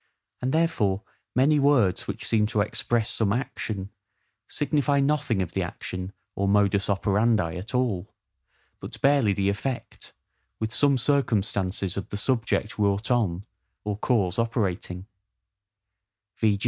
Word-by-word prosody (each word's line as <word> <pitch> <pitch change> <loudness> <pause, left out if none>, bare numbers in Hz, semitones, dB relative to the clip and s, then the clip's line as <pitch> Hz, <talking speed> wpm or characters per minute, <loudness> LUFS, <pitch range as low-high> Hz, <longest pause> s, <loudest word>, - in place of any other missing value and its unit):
And 130 +1 0
therefore 115 - +1 0.3
many 145 +4 +4
words 135 -10 +3
which - - -5
seem 105 -2 +3
to 105 -1 +1
express 110 +2 0
some 105 -3 +1
action, 105 -4 -3 0.6
signify 145 -1 +1
nothing 140 -8 +1
of 85 - -8
the - - 0
action 90 +1 -5 0.2
or 100 - -1
MODUS 100 0 +3
OPERANDI 100 -3 +2
at 110 +8 -6
all, 110 -7 0 0.7
but - - -8
barely 135 -6 +4
the 95 0 0
effect, 120 +5 -4 0.5
with 110 0 -2
some 140 +1 +4
circumstances 100 - 0
of 100 - -4
the 100 - -4
subject 115 +1 -1
wrought 100 +2 +1
on, 100 -7 +1 0.4
or 105 -1 -2
cause 105 -3 +1
operating: 95 -5 -1 1.3
v. 105 -3 +2
105 Hz, 130 wpm, -26 LUFS, 100-125 Hz, 1.3 s, many